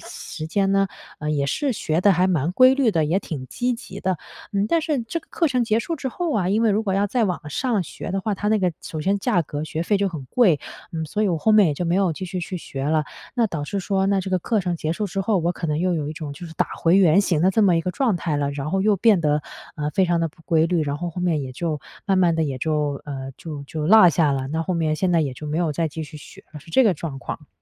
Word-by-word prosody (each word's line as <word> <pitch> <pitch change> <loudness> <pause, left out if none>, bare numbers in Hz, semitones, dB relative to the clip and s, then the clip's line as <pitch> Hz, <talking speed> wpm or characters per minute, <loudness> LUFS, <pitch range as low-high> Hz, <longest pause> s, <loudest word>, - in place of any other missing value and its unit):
时 155 - -7
间 195 +3 +1
呢， 195 0 +3 0.3
呃， 150 0 -3
也 145 -2 +1
是 270 - 0
学 160 -7 -1
得 200 +1 +5
还 180 +2 +3
蛮 165 -4 +1
规 255 +6 +6
律 265 -4 +3
的， 165 -6 +1
也 165 +6 +1
挺 140 -9 -6
积 250 - -1
极 200 -5 -9
的。 185 -3 -1 0.3
嗯， 200 0 +1
但 335 - +3
是 305 -4 -1
这 230 +9 -3
个 - - -26
课 335 - +1
程 250 -3 +1
结 220 -1 +2
束 330 +7 -3
之 270 -2 -3
后 335 +5 -2
啊， 190 -4 +1
因 215 +4 +2
为 225 - +4
如 210 +2 +1
果 195 -3 -1
要 200 +1 +2
再 235 +2 +1
往 175 -5 -3
上 225 - 0
学 170 - -7
的 195 +1 -1
话， 210 +2 -1
它 205 +2 -2
那 215 0 +3
个 180 -3 +1
首 155 - -6
先 195 +5 +1
价 175 -2 +1
格 150 0 -5
学 160 +1 -3
费 205 +4 +2
就 200 0 +1
很 155 -7 -7
贵， 185 - +3 0.3
嗯， 160 -1 -3
所 210 +7 -2
以 210 - +2
我 175 - +1
后 220 - +2
面 210 -2 +6
也 150 - 0
就 175 - -3
没 170 0 +1
有 190 -4 +2
继 185 - -6
续 185 0 -4
去 180 +2 -4
学 135 -5 -6
了。 155 +1 +1 0.3
那 240 -3 +3
导 165 -8 -4
致 195 +6 -3
说 195 0 0
那 195 -1 +2
这 190 - -5
个 185 - +2
课 215 +4 0
程 175 -2 -2
结 160 -1 -2
束 210 +4 -2
之 195 +1 -3
后， 200 +1 +1
我 170 0 +1
可 170 - -4
能 150 -1 0
又 180 +1 +1
有 150 -3 -2
一 155 - -4
种 155 -2 -6
就 160 +5 -9
是 160 - -11
打 - - +1
回 170 +2 +4
原 190 -1 +5
形 175 -6 +1
的 185 - +5
这 215 +3 +2
么 180 -4 +4
一 - - +2
个 180 - -2
状 245 +1 +1
态 165 -3 -2
了， 140 -1 0
然 140 +1 -4
后 195 - +1
又 210 0 +3
变 205 -1 +4
得， 150 -1 +1 0.3
呃， 150 0 -2
非 190 +5 +2
常 175 -1 +1
地 165 - 0
不 160 +2 -21
规 160 -1 +3
律。 170 -1 +1
然 145 -1 -2
后 175 +3 -4
后 180 - -6
面 170 -5 +1
也 130 - -6
就 155 +2 -3 0.3
慢 195 - +2
慢 175 -2 +4
地 160 0 +1
也 135 -3 -3
就 150 -1 -1
嗯， 135 -2 -6
就 150 -4 -7
就 150 +1 -4
落 210 0 +8
下 165 -2 +2
了， 135 -1 -2
那 160 +3 -1
后 180 - -2
面 160 -2 +1
现 185 +3 0
在 170 - +4
也 140 -4 -1
就 150 +4 -8
没 150 +2 -1
有 170 -3 +1
再 165 +2 -1
继 160 +2 -6
续 150 +1 -11
学 150 - -13
了， 150 - -9
是 165 - -15
这 260 - +5
个 205 -5 +4
状 145 -4 -6
况。 150 - -7
175 Hz, 325 characters per minute, -23 LUFS, 155-200 Hz, 0.3 s, 落